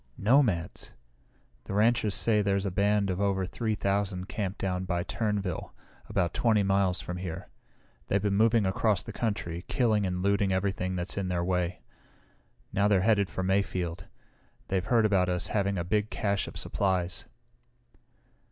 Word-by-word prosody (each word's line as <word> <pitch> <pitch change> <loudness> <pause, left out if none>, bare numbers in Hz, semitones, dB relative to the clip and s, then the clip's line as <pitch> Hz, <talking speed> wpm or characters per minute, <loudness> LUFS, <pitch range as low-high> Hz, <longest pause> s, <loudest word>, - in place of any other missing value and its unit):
"Nomads! 105 - +1 0.7
The 100 - -4
ranchers 110 -1 +3
say 110 -2 +3
there's 100 -1 0
a 100 - -1
band 100 +1 +2
of 90 +2 -2
over 95 -2 +1
three 110 +4 -2
thousand 100 -2 -1
camped 100 -2 -3
down 90 -1 -2
by 90 -1 -1
Turnerville, 100 -4 -2 0.4
about 85 -2 0
20 110 -3 +2
miles 95 -2 +1
from 90 - -5
here. 90 -3 -6 0.6
They've 100 - +2
been 100 -1 +1
moving 110 +1 +3
across 95 +1 +1
the 115 - -8
country, 95 -7 -3
killing 110 -5 +2
and 90 0 -2
looting 100 0 +2
everything 95 -1 -1
that's 90 +2 -3
in 95 - -2
their 90 -1 -1
way. 90 -6 -1 0.9
Now 100 +1 +3
they're 100 -3 +3
headed 100 -2 +3
for 95 - -3
Mayfield. 90 -3 -1 0.6
They've 95 -2 0
heard 115 0 +3
about 95 -4 +2
us 90 +1 -1
having 100 -2 0
a 85 - -1
big 105 +4 0
cache 100 -2 -1
of - - -8
supplies." 95 -2 -1
100 Hz, 160 wpm, -28 LUFS, 90-105 Hz, 0.9 s, ranchers